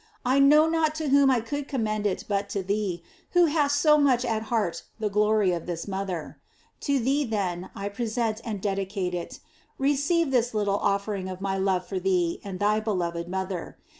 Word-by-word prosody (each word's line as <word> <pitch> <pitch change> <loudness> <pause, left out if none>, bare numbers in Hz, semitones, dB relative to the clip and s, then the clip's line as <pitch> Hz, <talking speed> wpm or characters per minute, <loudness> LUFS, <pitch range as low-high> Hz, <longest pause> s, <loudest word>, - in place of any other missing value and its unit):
I 260 +2 +3
know 300 +3 +6
not 320 -1 +1
to 310 -2 -2
whom 280 0 +5
I 250 -3 +3
could 285 +5 -4
commend 215 -5 -1
it 190 - -3
but 200 -1 -1
to 195 - -2
thee, 195 -3 -2 0.3
who 355 -1 +6
hast 290 -2 +2
so 300 0 +5
much 255 -4 +3
at 220 -1 0
heart 215 -8 0 0.2
the 210 -2 -1
glory 210 -1 +3
of 170 -1 -3
this 170 0 -4
mother. 190 -5 -4 0.5
To 280 - +4
thee, 270 +4 +1
then, 190 -7 -2
I 200 0 -4
present 225 +1 -2
and 215 -4 -4
dedicate 195 -2 -2
it. 175 -1 -5 0.4
Receive 285 +3 +1
this 245 -2 +1
little 205 -1 +1
offering 200 -1 -1
of 185 -1 -6
my 195 0 -1
love 190 -2 +1
for 190 0 -3
thee 180 -2 0
and 195 -2 -6
thy 210 +1 +2
beloved 175 -5 -2
mother. 190 -1 -4
210 Hz, 190 wpm, -26 LUFS, 190-270 Hz, 0.5 s, know